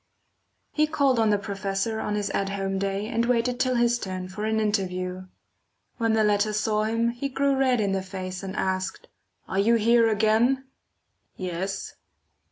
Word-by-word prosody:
He 305 0 +2
called 275 -5 +2
on 220 -1 +3
the 205 - +3
professor 200 +2 -2
on 210 - -2
his 205 -1 -1
at 195 0 -1
home 195 -1 -2
day 195 +1 -1
and 230 +1 0
waited 245 0 +1
till 255 -1 +2
his 240 0 +2
turn 185 -3 -5
for 210 +3 -4
an 220 0 +1
interview. 185 -3 -2 0.7
When 230 -2 +1
the 220 0 +3
latter 210 0 +2
saw 215 0 +1
him, 230 +1 +1
he 245 +4 -3
grew 275 +1 +1
red 260 -2 +2
in 200 -2 +1
the 195 0 0
face 185 -1 -6
and 190 -1 -6
asked: 190 - -2 0.4
"Are 190 - -1
you 230 +4 +4
here 230 +1 +4
again?" 220 +5 +2 0.7
"Yes." 185 +1 -4
210 Hz, 175 wpm, -26 LUFS, 195-235 Hz, 0.7 s, you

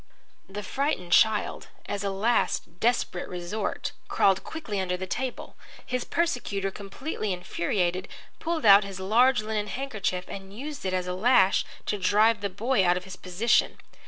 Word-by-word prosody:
The 205 +2 -6
frightened 265 - -2
child, 215 +3 +3 0.2
as 205 -1 -3
a 200 - 0
last 195 -4 0
desperate 230 -6 0
resort, 180 +4 -3 0.2
crawled 195 -1 +3
quickly 230 -11 -5
under 180 -1 -1
the 185 - -4
table. 255 +7 -4 0.3
His 250 -1 -2
persecutor, 210 - -1
completely 210 +3 -5
infuriated, 180 +1 -1 0.3
pulled 330 -3 -2
out 200 0 +9
his 195 -1 -7
large 230 +5 +3
linen 215 -1 -2
handkerchief 210 -9 -3
and 195 +1 -9
used 290 -2 -6
it 185 - -1
as 180 -1 -1
a 180 - -3
lash 195 -1 +4 0.2
to 205 - -1
drive 210 +3 +3
the 200 - -1
boy 215 +3 +1
out 175 0 +3
of 180 - -5
his 190 -1 -9
position. 185 +6 +1
200 Hz, 160 wpm, -27 LUFS, 185-235 Hz, 0.3 s, out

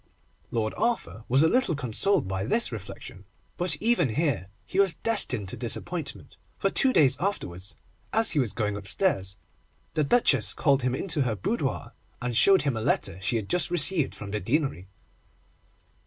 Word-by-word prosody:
Lord 110 -2 -2
Arthur 175 - -2
was 135 +4 +4
a - - +5
little 245 -4 +1
consoled 130 - +1
by 95 0 -3
this 225 - +1
reflection, 100 -2 -9 0.3
but 180 +1 +3
even 195 - +1
here 140 - 0 0.2
he 190 - -3
was 195 -5 +4
destined 205 - -1
to - - -3
disappointment, - - -4 0.2
for 195 - 0
two 265 - +2
days 145 - +4
afterwards, 95 - -4 0.4
as 225 0 +3
he 150 - +1
was 120 -6 0
going 105 -3 -2
upstairs, 100 - -1 0.6
the 155 - +1
Duchess 240 - +3
called 140 -4 +2
him 125 0 0
into 160 0 -1
her 120 -5 0
boudoir, 95 - -3 0.3
and 120 -1 -3
showed 195 - +5
him 140 -4 -1
a 110 - -3
letter 95 -3 -1
she 100 - 0
had 110 -4 -2
just 180 0 0
received 175 -2 +4
from 100 -1 -8
the 105 - -2
Deanery. 120 - -1
130 Hz, 170 wpm, -26 LUFS, -, 0.6 s, a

